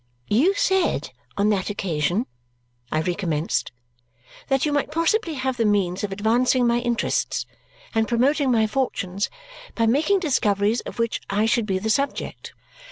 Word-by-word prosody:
"You 300 - +3
said 380 -2 +1 0.3
on 205 +1 +3
that 200 -2 0
occasion," 185 +2 -1 0.7
I 155 - +1
recommenced, 170 -3 -1 0.8
"that 270 +1 +2
you 300 - 0
might 290 0 0
possibly 330 +3 +1
have 260 -1 -2
the 230 - +2
means 200 -3 +1
of 205 - -2
advancing 240 +5 +2
my 235 0 +3
interests 240 -1 -1 0.5
and 225 -1 +1
promoting 270 +4 +2
my 225 -2 +3
fortunes 205 -6 -1 0.5
by 230 - +2
making 305 - +3
discoveries 215 - +1
of - - -8
which 230 -1 -1
I 205 +2 +1
should 225 0 +1
be 190 -2 0
the 220 +4 -1
subject. 280 +4 -2
230 Hz, 150 wpm, -23 LUFS, 200-270 Hz, 0.8 s, You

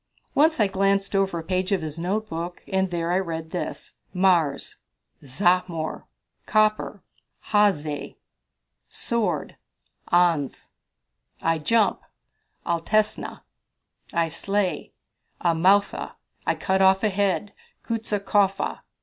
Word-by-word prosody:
Once 315 +1 +3
I 215 - +5
glanced 195 +1 +1
over 195 -3 +1
a 165 - -4
page 185 +2 -1
of 190 -4 +1
his 155 +1 -6
notebook, 175 -2 -3
and 190 -1 0
there 170 -1 -2
I 180 - +3
read 165 -3 -4
this: 180 - -5 0.2
"Mars 175 -6 +2 0.5
Zahmor." 170 +2 0 0.4
"Copper 215 -1 +1 0.5
Hayez." 155 -9 +1 0.7
"Sword 205 -10 -2 0.5
Anz." 170 -6 +2 0.7
"I 165 0 +1
jump 215 +8 +2 0.6
Altesna." 195 +6 0 0.7
"I 170 -1 +1
slay 195 +4 -1 0.5
Amoutha." 180 +4 +2 0.3
"I - - +2
cut 190 0 0
off 190 +1 +5
a 215 - +3
head 200 0 0 0.3
Ksutaskofa." 205 -3 0
190 Hz, 100 wpm, -24 LUFS, 165-205 Hz, 0.7 s, I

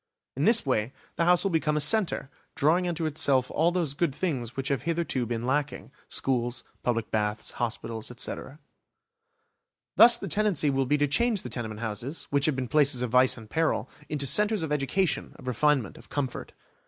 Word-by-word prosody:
In 140 - 0
this 225 -2 +5
way 125 -1 -1 0.2
the 170 - 0
house 180 0 +4
will 195 - 0
become 155 -2 0
a - - +2
centre, 160 -3 +2 0.2
drawing 170 +5 +2
unto 170 -2 -2
itself 140 -4 +2
all 165 +3 +2
those 170 -6 0
good 145 -2 -1
things 130 -10 -3
which 135 0 -2
have 140 -5 0
hitherto 160 -7 -2
been 115 0 -3
lacking: 140 0 -2 0.2
schools, 120 -1 -1 0.2
public 115 -3 -2
baths, 105 0 -2
hospitals, 115 -1 -4
etc. 125 +3 -5 1.4
Thus 235 +1 +8
the 195 - -6
tendency 190 -7 +1
will 135 -1 0
be 150 - +2
to 145 0 +1
change 220 - +1
the - - -6
tenement 110 -3 -5
houses, 115 +7 -4
which 140 +1 +2
have 155 - +1
been 130 -1 -3
places 140 -3 +3
of 120 - -3
vice 125 0 +4
and 110 -2 -11
peril, 160 +8 0 0.2
into 145 -2 -1
centres 210 - +3
of 155 - -4
education, 150 +6 0
of - - -14
refinement, 130 -1 0
of - - -16
comfort. 135 -4 -4
140 Hz, 185 wpm, -27 LUFS, 125-165 Hz, 1.4 s, Thus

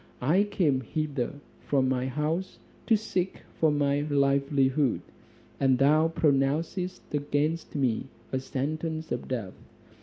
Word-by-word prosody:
I 170 +11 +3
came 165 -10 +1
hither 145 0 -2 0.2
from 135 -2 +1
my 130 0 0
house 155 +7 -2 0.3
to 225 - +5
seek 190 -3 -2 0.2
for 160 - +4
my 145 -1 +2
livelihood, 140 -1 +2 0.6
and 135 -2 +4
thou 150 +4 +4
pronouncest 160 +4 0
against 150 +3 -1
me 130 -3 0 0.2
a 130 - 0
sentence 155 +4 -3
of 120 - -3
death. 115 -8 -3
145 Hz, 120 wpm, -28 LUFS, 135-160 Hz, 0.6 s, to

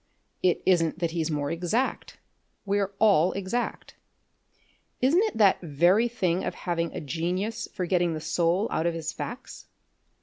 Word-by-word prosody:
It 180 -1 +1
isn't 170 -4 +2
that 170 -2 -1
he's 165 -1 -1
more 145 -2 -2
exact. 180 +10 -2 0.5
We're 200 0 0
all 195 -5 +4
exact. 200 +5 -4 1.0
Isn't 290 +9 +4
it 435 - -4
that 205 -3 +4
very 175 +8 +3
thing 185 -7 -1
of - - -3
having 170 -2 -2
a - - -3
genius 180 - -3
for 185 - -3
getting 175 -2 +1
the - - -4
soul 175 +6 +1
out 160 - 0
of 170 - -1
his 160 -1 -4
facts? 245 +2 -8
180 Hz, 155 wpm, -27 LUFS, 165-205 Hz, 1.0 s, all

